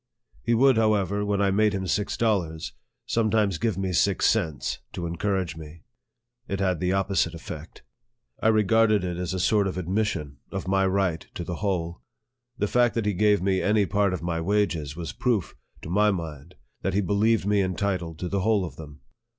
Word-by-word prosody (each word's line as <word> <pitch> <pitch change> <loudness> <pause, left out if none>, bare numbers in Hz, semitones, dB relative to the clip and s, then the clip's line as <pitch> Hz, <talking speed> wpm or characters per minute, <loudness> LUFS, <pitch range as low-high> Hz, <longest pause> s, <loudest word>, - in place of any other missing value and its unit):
He 115 - +1
would, 130 +1 +5
however, 105 -2 +2
when 100 -1 +1
I 100 - +2
made 105 +1 +3
him 95 -1 -2
six 100 +2 -1
dollars, 90 -9 -1 0.3
sometimes 110 -5 +1
give 115 -4 0
me 95 -1 -2
six 95 +3 +2
cents, 85 -10 0
to 85 - -4
encourage 90 +1 -1
me. 80 -1 -11 0.6
It 100 - -3
had 95 -4 +1
the 90 +1 0
opposite 95 -4 +1
effect. 85 - -9 0.6
I - - +2
regarded 110 -1 +4
it 90 -1 -3
as 90 -1 -3
a - - -2
sort 100 +2 +2
of 95 - -4
admission 90 -6 -2
of - - -4
my 95 0 +2
right 95 -4 0
to 85 - -4
the 85 0 -5
whole. 85 - -2 0.6
The 105 - 0
fact 120 +2 +2
that 115 -2 0
he 105 - +1
gave 105 0 +3
me 95 -1 +1
any 105 -1 +3
part 100 +2 +1
of 90 -2 -4
my 85 -1 -1
wages 85 -6 0
was 85 -1 -5
proof, 115 -8 0 0.3
to - - -7
my 105 +3 +4
mind, 80 -4 -5 0.3
that 95 0 -1
he 100 - +3
believed 105 +2 +2
me 100 0 +3
entitled 95 -3 -2
to 90 - -2
the 100 +2 -1
whole 105 -1 +2
of 75 -5 -9
them. 75 -2 -11
95 Hz, 190 wpm, -26 LUFS, 85-105 Hz, 0.6 s, would